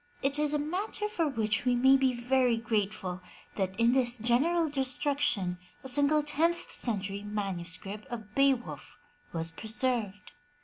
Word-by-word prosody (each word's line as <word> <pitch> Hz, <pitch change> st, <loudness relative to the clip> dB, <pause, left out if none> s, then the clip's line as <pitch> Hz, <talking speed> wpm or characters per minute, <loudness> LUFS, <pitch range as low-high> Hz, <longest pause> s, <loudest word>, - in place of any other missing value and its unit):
It 280 Hz, +2 st, +1 dB
is 300 Hz, -1 st, +2 dB
a 300 Hz, -, +1 dB
matter 370 Hz, +8 st, -2 dB
for 345 Hz, -7 st, 0 dB
which 220 Hz, -6 st, 0 dB
we 250 Hz, -1 st, +2 dB
may 265 Hz, +2 st, +6 dB
be 265 Hz, -1 st, +3 dB
very 250 Hz, 0 st, +2 dB
grateful, 205 Hz, -5 st, -2 dB, 0.3 s
that 190 Hz, +1 st, -2 dB
in 230 Hz, +1 st, +5 dB
this 250 Hz, -2 st, +2 dB
general 280 Hz, +9 st, +2 dB
destruction, 265 Hz, -, 0 dB, 0.2 s
a -, -, -7 dB
single 285 Hz, +3 st, +3 dB
tenth 325 Hz, +4 st, 0 dB
century 200 Hz, -3 st, -2 dB
manuscript 195 Hz, -1 st, -5 dB
of 220 Hz, -3 st, -8 dB
Beowulf 275 Hz, -2 st, 0 dB, 0.3 s
was 165 Hz, -1 st, -1 dB
preserved. 220 Hz, 0 st, -1 dB
245 Hz, 140 wpm, -30 LUFS, 210-280 Hz, 0.3 s, may